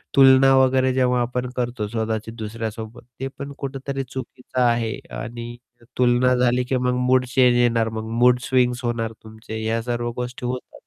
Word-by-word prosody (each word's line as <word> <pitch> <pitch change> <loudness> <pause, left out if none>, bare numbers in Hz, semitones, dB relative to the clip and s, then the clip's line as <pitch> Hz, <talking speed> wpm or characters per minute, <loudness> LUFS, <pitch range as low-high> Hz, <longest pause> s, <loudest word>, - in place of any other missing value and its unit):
तुलना 135 0 +7
वगैरे 130 0 +3
जेव्हा 125 -1 +2
आपण 125 +1 -2
करतो, 120 -3 -2
स्वतःची 110 0 -3
दुसऱ्यासोबत, 110 0 -6 0.2
ते 135 - -2
पण 140 0 -6
कुठेतरी 135 0 -4
चुकीचं 130 0 -5
आहे 115 -2 +1 0.2
आणि 120 0 -7 0.4
तुलना 125 0 +3
झाली 125 0 +2
की 130 +1 -2
मग 125 0 0
मूड 130 0 +4
चेंज 125 -1 +3
येणार, 115 -2 +2
मग 110 0 -5
मूड 125 0 +5
स्विंग्स 125 0 +1
होणार 115 -1 -1
तुमचे, 110 0 -8
या 115 +1 0
सर्व 120 0 -2
गोष्टी 125 0 -6
होतात. 125 +1 -5
125 Hz, 160 wpm, -22 LUFS, 115-130 Hz, 0.4 s, तुलना